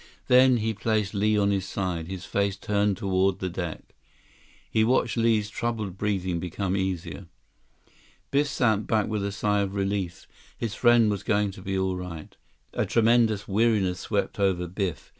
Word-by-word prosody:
Then 125 0 +6
he 110 0 -1
placed 110 -1 -1
Li 105 +1 +2
on 100 -1 +2
his 95 -1 -1
side, 90 -5 -3
his 95 -1 -6
face 100 -1 -1
turned 100 -1 0
toward 95 0 +1
the 95 - -3
deck. 85 -2 -6 0.7
He 110 - +2
watched 125 +4 +2
Li's 115 -3 +2
troubled 110 -4 -3
breathing 95 -4 -1
become 90 +2 -2
easier. 95 -1 -3 1.0
Biff 145 +1 +2
sank 110 -7 +1
back 110 -2 +1
with 105 -2 -2
a 100 - -2
sigh 105 +1 0
of 100 0 -3
relief. 95 -3 -2 0.3
His 115 -3 -3
friend 120 -1 +4
was 100 - -2
going 105 -1 +1
to 95 - -12
be 95 0 -2
all 95 -1 0
right. 90 -4 -8 0.4
A - - -1
tremendous 115 -2 +3
weariness 100 -3 +1
swept - - -2
over 95 -3 +1
Biff. 90 -5 -4
100 Hz, 165 wpm, -26 LUFS, 95-110 Hz, 1.0 s, Then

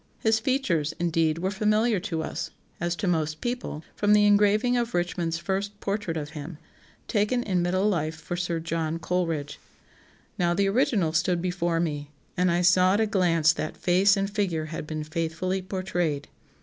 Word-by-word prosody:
His 220 0 +2
features, 215 - 0
indeed, 165 -2 +1
were 185 +3 -1
familiar 215 +1 +2
to 170 -4 -3
us, 165 +2 -4 0.3
as 175 0 -1
to 195 +2 -3
most 155 -3 0
people, 240 -10 -4
from 205 0 +3
the 210 0 +5
engraving 210 +4 +4
of 240 -1 -1
Richmond's 175 -1 -1
first 200 +3 -3
portrait 200 -5 -2
of 150 -1 -5
him, 155 +2 -7 0.5
taken 225 +3 +1
in 185 -5 0
middle 185 +3 +1
life 165 -5 0
for 160 +2 -5
Sir 175 -1 -2
John 165 0 -2
Coleridge. 165 -4 -2 0.8
Now 175 -1 +2
the 200 +1 +2
original 195 -6 +2
stood 175 +2 +1
before 175 -1 -1
me, 150 -3 -2 0.3
and 180 -1 +2
I 175 +1 +2
saw 185 +2 +5
at - - +1
a 220 - +3
glance 170 -6 +3
that 155 - -4
face 195 +3 +4
and 195 0 0
figure 195 -6 -1
had 155 - -5
been 155 -1 -4
faithfully 165 +4 -2
portrayed. 180 -5 -2
180 Hz, 175 wpm, -26 LUFS, 165-205 Hz, 0.8 s, the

